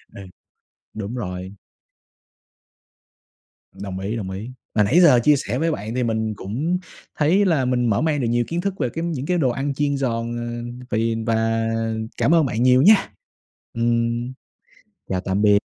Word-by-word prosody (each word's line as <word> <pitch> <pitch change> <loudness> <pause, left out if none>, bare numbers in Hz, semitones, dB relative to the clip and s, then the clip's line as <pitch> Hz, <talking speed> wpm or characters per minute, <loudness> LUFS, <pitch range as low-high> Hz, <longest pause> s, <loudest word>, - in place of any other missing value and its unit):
Ừ, 100 - -8 0.7
đúng 110 +2 -5
rồi. 95 -4 -5 2.2
Đồng 95 -2 -6
ý, 100 +4 -3
đồng 95 -4 -4
ý. 100 +6 -6 0.2
Mà 105 - +4
nãy 150 - +4
giờ 145 -9 +7
chia 150 +3 +5
sẻ 125 -2 -3
với 165 +3 +1
bạn 110 -4 -4
thì 125 - 0
mình 110 -2 -1
cũng 140 - -2 0.4
thấy 170 +7 +3
là 160 -8 +2
mình 125 -1 +1
mở 100 - +2
mang 155 -2 +1
được 120 - 0
nhiều 120 +1 +1
kiến 170 +1 -2
thức 195 0 -2
về 125 - +1
cái 165 +1 -4
những 150 -5 -3
cái 180 -1 +1
đồ 130 -5 +2
ăn 135 +3 -2
chiên 145 0 0
giòn, 120 -3 -2
ờ, 120 +1 -6
vì 115 +1 +1
và 115 0 +1 0.5
cảm 165 - +3
ơn 160 -4 +4
bạn 115 0 -1
nhiều 130 +1 +5
nha. 210 +4 +5 0.6
Ừm, 115 +1 0 0.8
chào 95 -1 -1
tạm 95 +2 -1
biệt. 105 -1 +5
120 Hz, 175 wpm, -22 LUFS, 110-145 Hz, 2.2 s, giờ